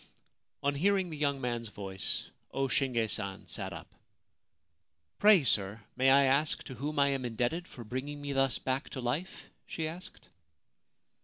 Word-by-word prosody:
On 140 0 +2
hearing 190 +4 +2
the - - -4
young 140 -2 0
man's 120 -3 -2
voice 95 -2 -3 0.2
O 135 0 0
Shinge 125 -4 +1
San 95 -2 -2
sat - - -3
up. - - -7 1.3
{Pray, 205 -6 +7
sir, 105 -3 +2 0.2
may 130 +1 +4
I 140 +1 +7
ask 140 +3 +2
to 130 - -8
whom 145 +5 -4
I 140 0 +5
am 135 -2 -1
indebted 125 +9 -1
for 120 - -10
bringing 130 +6 -4
me 145 -1 -3
thus 135 -2 +2
back 130 +2 -2
to - - -2
life? 135 +10 -3
' - - -44
she 160 -1 -3
asked. 175 +5 -9
135 Hz, 165 wpm, -31 LUFS, 120-150 Hz, 1.3 s, Pray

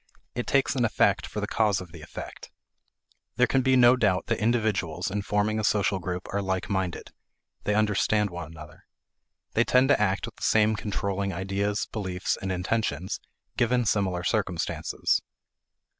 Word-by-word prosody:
It 120 - -3
takes 135 -1 +2
an 125 - +1
effect 110 - +2
for - - -5
the - - 0
cause 105 -3 +2
of 90 -3 -9
the 80 -2 -11
effect. - - -9 0.9
There 125 - +4
can 135 +1 +2
be 130 0 +3
no 125 0 +7
doubt 100 -7 +1
that - - -1
individuals 105 -8 0
in 105 +1 -1
forming 105 +2 0
a - - -2
social 100 -2 +2
group 90 +1 -4
are 100 - 0
like 95 +1 -2
minded; 95 -3 -2 0.5
they 105 - +1
understand 105 -1 +2
one 85 -3 -6
another. 75 -1 -13 0.7
They 120 - +4
tend 130 +2 +3
to 140 - +4
act 100 -1 +1
with - - -11
the - - -18
same 110 0 +3
controlling 100 -2 -2
ideas, 100 +3 -1
beliefs, 95 -4 -2
and 95 - -4
intentions, 90 -2 -1 0.4
given 120 0 +2
similar 95 -4 0
circumstances. 95 -4 0
100 Hz, 165 wpm, -27 LUFS, 95-110 Hz, 0.9 s, no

